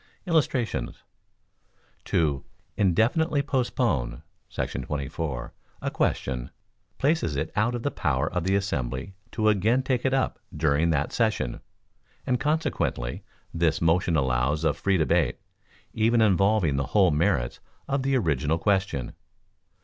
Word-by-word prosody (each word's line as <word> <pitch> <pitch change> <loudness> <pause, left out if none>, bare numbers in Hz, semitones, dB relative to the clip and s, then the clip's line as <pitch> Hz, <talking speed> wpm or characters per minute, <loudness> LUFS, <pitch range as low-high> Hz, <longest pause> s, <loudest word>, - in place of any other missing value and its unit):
Illustrations: 130 - 0 1.0
To 75 -4 +1 0.3
"Indefinitely 130 - +2
Postpone" 115 - -1 0.3
[§ - - -3
24] 70 -3 -4 0.3
a - - -3
question, 60 -1 -1 0.5
places 140 - +1
it 80 +3 -2
out 115 +4 +1
of 120 - -4
the 145 - 0
power - - 0
of 90 - 0
the 95 +1 +2
assembly 95 -3 -2 0.2
to 110 -1 0
again 110 +5 +3
take 130 -2 0
it 130 - +2
up 135 0 0 0.2
during 80 +1 +2
that 75 -3 0
session, 110 - 0 0.7
and 125 - +1
consequently 145 - -1 0.3
this 80 -1 +1
motion 85 +1 +2
allows 65 +2 +1
of 80 - +2
free 100 -1 +1
debate, 80 -1 +2 0.6
even 115 +2 +3
involving 100 -6 +3
the 70 - -1
whole 95 -4 +6
merits 75 -5 +1 0.3
of 140 0 0
the 135 0 +2
original 80 - +1
question. 95 -8 0
90 Hz, 125 wpm, -26 LUFS, 75-120 Hz, 1.0 s, whole